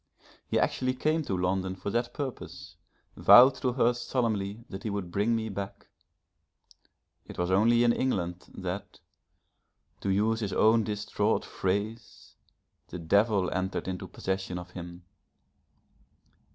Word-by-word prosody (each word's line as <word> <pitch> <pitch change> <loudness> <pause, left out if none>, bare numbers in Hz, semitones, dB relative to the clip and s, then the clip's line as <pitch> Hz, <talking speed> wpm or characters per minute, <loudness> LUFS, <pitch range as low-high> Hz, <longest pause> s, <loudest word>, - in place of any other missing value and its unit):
He - - 0
actually 130 0 0
came 155 +5 +1
to 95 - -1
London 95 +1 -1
for 100 +2 -5
that 120 +2 -1
purpose, 85 - -7 0.4
vowed 130 +2 +8
to 125 -1 0
her 120 -1 +3
solemnly 115 -3 -2
that 95 - -8
he 110 - -3
would 100 -4 -4
bring 105 +5 +1
me 110 -1 -2
back; 100 -1 -7 1.4
it - - -10
was 90 +1 -1
only 115 +5 +4
in 120 0 +4
England, 90 -10 -2
that, 95 +2 -6 1.0
to 100 - -3
use 110 +3 +2
his 100 -4 -3
own 110 +3 +4
distraught 105 -1 -1
phrase, 100 +4 -4 0.5
the - - -7
Devil 100 +3 +2
entered 95 +1 -2
into 90 -1 -4
possession 95 -1 -3
of 90 0 -8
him. 90 0 -9
100 Hz, 135 wpm, -28 LUFS, 95-115 Hz, 1.4 s, vowed